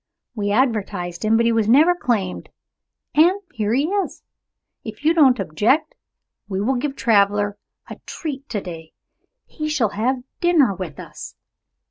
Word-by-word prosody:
We 205 -3 -2
advertised 205 -7 -1
him, 220 +1 +3
but 230 - +2
he 230 - +3
was 225 -2 +1
never 305 +9 +6
claimed 220 - -2 0.6
and 345 +6 +4
here 210 -1 -1
he 275 - +2
is! 395 +3 -2 0.6
If 220 +5 -9
you 320 - +5
don't 275 -7 +5
object, 205 - +1 0.6
we 190 -1 -2
will 225 +7 +1
give 275 +2 -3
Traveler 205 -3 +2 0.3
a - - -9
treat 285 -4 -6
to 210 -4 -2
day. 165 -3 -9 0.5
He 305 -1 -5
shall 270 -8 +1
have 245 +5 -1 0.2
dinner 325 - +3
with 180 -6 -7
us." - - -10
225 Hz, 150 wpm, -21 LUFS, 205-285 Hz, 0.6 s, never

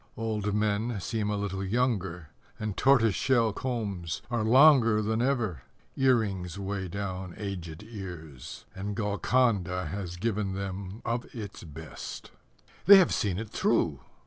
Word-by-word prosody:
Old 105 -2 -1
men 105 +1 0
seem 105 +3 -2
a 105 - 0
little 100 -1 -3
younger, 95 - -1 0.3
And 110 -2 -3
tortoise 120 -6 +4
shell 115 -1 +2
combs 100 -10 -3
Are 120 -3 0
longer 120 -2 +6
than 110 +2 0
ever; 120 - 0 0.3
Earrings 100 -9 +1
weigh 100 -1 -3
down 95 -1 -5
aged 90 -4 -6
ears; 90 - -9
And 100 +1 -4
Golconda 105 -3 +1
has 90 -1 -5
given 100 0 -1
them 95 +1 -5
of 120 +1 -1
its 105 -4 -7
best. 80 0 -8 0.6
They 200 0 +11
have 185 -3 +4
seen 95 -4 0
it 110 +1 -5
through! - - +1
100 Hz, 135 wpm, -29 LUFS, 95-115 Hz, 0.6 s, They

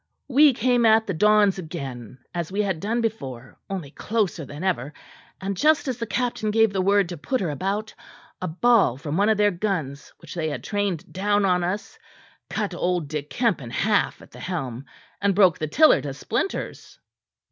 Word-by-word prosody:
We 285 +1 +6
came 245 +1 +2
at 220 0 +5
the 195 - -2
dons 210 +2 +4
again 135 - -7 0.2
as 170 -1 -3
we 205 +2 0
had 190 -5 -1
done 225 +6 -1
before, 135 - -5
only 180 -8 -5
closer 200 -5 -1
than 145 +5 -8
ever; 155 -6 -1 0.4
and 195 +1 -3
just 305 +7 +3
as 250 -2 -2
the 230 - -3
captain 235 0 -1
gave 225 -1 +3
the 190 - +1
word 200 -1 +3
to 175 - -6
put 255 - -1
her 175 -6 -1
about, 195 +8 -3 0.5
a 185 - -2
ball 195 - +3
from 145 +2 -4
one 200 +4 +3
of 220 - +3
their 205 0 +4
guns 170 -7 -3
which - - -11
they 160 -3 -2
had 145 - -5
trained 205 -6 -2
down 205 +2 +1
on 180 -2 +2
us, 185 +4 -4 0.5
cut 205 -3 -2
old 175 -3 -1
Dick 150 -2 -4
Kemp 230 - 0
in 120 - -8
half 205 - 0
at - - -17
the - - -12
helm, 135 -8 -4 0.4
and 200 -1 +2
broke 185 -5 +5
the 155 - -2
tiller 310 - +5
to 140 -2 -5
splinters." 235 - -4
195 Hz, 190 wpm, -24 LUFS, 155-215 Hz, 0.5 s, We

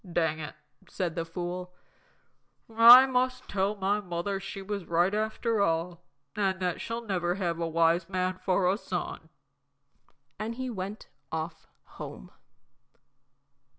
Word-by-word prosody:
"Dang 160 -2 +1
it," 155 - -7 0.3
said 180 -4 -2
the 165 -1 -3
fool. 180 +1 -5 1.0
"I 240 +3 +10
must 255 -1 -1
tell 200 +1 0
my 200 +1 0
mother 185 +1 -3
she 195 0 -7
was 200 -2 -4
right 175 +3 +2
after 220 +1 0
all, 170 -1 0 0.3
and 195 -2 0
that 180 -2 -2
she'll 230 +1 -4
never 180 -4 0
have 170 -4 -2
a 165 - -1
wise 165 +2 +2
man 185 -1 -1
for 185 -1 +2
a 195 +3 +1
son!" - - -5 1.1
And 220 +2 -3
he 260 0 -4
went 200 0 -6 0.2
off 160 0 -5 0.2
home. - - -10
185 Hz, 135 wpm, -29 LUFS, 170-210 Hz, 1.1 s, I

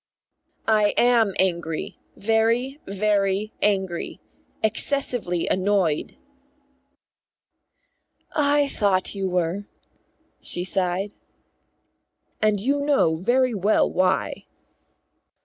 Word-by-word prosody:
"I 215 -2 +3
am 235 -5 +3
angry. 170 -4 -2 0.2
Very, 230 +6 +1
very 200 +1 0
angry. 190 -4 -1 0.4
Excessively 220 -5 +1
annoyed." 185 -5 0 2.2
"I 290 -1 +3
thought 200 -7 0
you 195 -2 -2
were," 180 +3 -1 0.7
she 175 - -1
sighed. 185 +2 0 1.3
"And 215 -1 +2
you 275 +7 0
know 285 - +2
very 245 +7 +1
well 205 +1 +2
why." 185 +1 0
205 Hz, 80 wpm, -23 LUFS, 185-230 Hz, 2.2 s, I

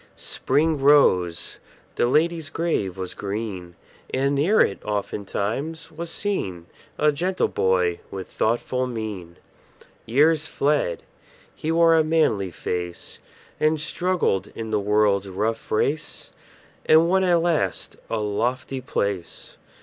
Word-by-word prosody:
Spring 150 +2 0
rose; 90 - +3 0.3
the - - +1
lady's 160 +3 +1
grave 130 - -1
was 95 -1 -5
green; 100 -4 -5 0.4
And 135 +2 +1
near 160 +10 +3
it, 100 - +2
oftentimes, 105 +9 -3
was 165 +2 -6
seen 95 - -2 0.3
A 150 0 +4
gentle 180 +6 0
boy 90 -2 +1
with 95 -1 -6
thoughtful 125 +3 -1
mien. 105 -8 -6 0.7
Years 150 +6 +3
fled; 140 - 0 0.5
he 155 - -3
wore 165 0 +5
a 160 -1 +5
manly 155 - +1
face, 90 0 -5 0.4
And 155 0 +2
struggled 170 - 0
in 110 -1 -5
the 105 - +2
world's 100 -1 +2
rough 110 +4 -2
race, 145 +8 -1 0.6
And 160 +1 +6
won 190 +2 +3
at 175 -2 +4
last 165 -2 -1
a 115 - -1
lofty 120 +5 -2
place. 100 -8 -3
125 Hz, 120 wpm, -24 LUFS, 100-155 Hz, 0.7 s, And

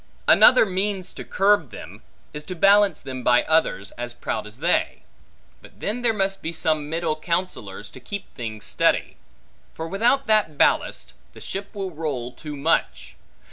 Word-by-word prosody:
Another - - +7
means 190 -1 -2
to - - -7
curb 195 -7 +2
them, - - -11 0.3
is 150 0 -6
to 185 - -6
balance 195 -1 +4
them 130 -1 -6
by 125 0 +4
others, 155 -11 +1
as 120 0 -5
proud 110 -3 -4
as 105 +2 -10
they. 170 +6 0 0.6
But - - -18
then 220 +5 -3
there 240 -1 +3
must 195 -2 -1
be 165 - -4
some 155 -2 0
middle 165 -1 -1
counsellors, 155 - -4
to - - -11
keep 200 +11 -8
things 110 -4 -6
steady; - - +1 0.6
for 160 - -5
without 235 +9 +1
that 215 -9 +2
ballast, - - +1 0.2
the - - -13
ship 200 +2 -7
will 195 -2 -4
roll 145 -7 -4
too 150 +2 -8
much. 65 - -1
165 Hz, 165 wpm, -23 LUFS, 130-195 Hz, 0.6 s, Another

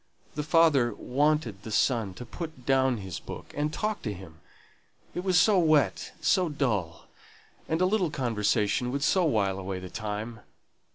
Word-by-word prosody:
The 150 - -2
father 145 -7 +3
wanted 140 -6 0
the 110 - -8
son 110 -4 +1
to 125 - -8
put 155 -1 -8
down 130 -2 +3
his 95 -4 -6
book, - - -9
and 150 +1 -1
talk 215 +5 -2
to 105 - -3
him: 85 -4 -12 0.7
it 180 - -4
was 185 -2 +4
so 205 -1 +5
wet, 155 -4 +2
so 185 -3 +2
dull, 105 - -2 0.6
and 160 +2 0
a - - +5
little 185 -3 +1
conversation 115 -2 0
would 140 +1 -2
so 180 +4 +3
wile 100 -9 +1
away 95 0 -4
the 90 0 -9
time! 110 +3 -5
130 Hz, 165 wpm, -28 LUFS, 105-155 Hz, 0.7 s, so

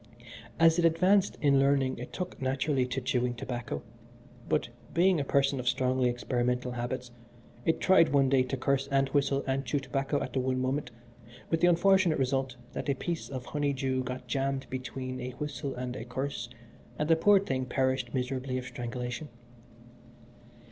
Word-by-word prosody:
As 165 +1 +5
it 170 - +3
advanced 185 +4 +3
in 140 -2 +4
learning 135 -2 +2
it 125 - -7
took 180 -5 -5
naturally 130 0 +1
to 125 +1 -2
chewing 125 -2 0
tobacco, 120 - -5 0.7
but, - - +1 0.3
being 180 0 +4
a - - 0
person 140 0 +2
of 125 - -5
strongly 130 -1 +1
experimental 125 0 -1
habits, 125 +1 -4 0.5
it 160 - +2
tried 190 -3 +5
one 140 -1 +4
day 135 0 +4
to 130 +1 -2
curse 135 +1 0
and 135 -1 +2
whistle 140 -1 +1
and 135 0 0
chew 130 +3 -1
tobacco 135 +1 -1
at 130 - -5
the 135 - +1
one 130 0 0
moment, 130 +1 -1 0.6
with 165 - +1
the 175 - +6
unfortunate 175 -1 +4
result 135 -1 0 0.2
that - - -4
a 140 - +2
piece 170 +4 -4
of 130 -2 -5
honeydew 135 -3 -1
got 125 0 -5
jammed 135 +1 -1
between 130 0 -5
a 125 0 -5
whistle 145 -1 -4
and 125 0 -4
a 115 - -5
curse, 125 0 -4 0.5
and 150 - -1
the 165 - +5
poor 200 +5 +5
thing 130 -9 -2
perished 130 -1 0
miserably 130 0 -2
of 125 - -4
strangulation. 125 +3 -5
135 Hz, 170 wpm, -30 LUFS, 125-145 Hz, 0.7 s, the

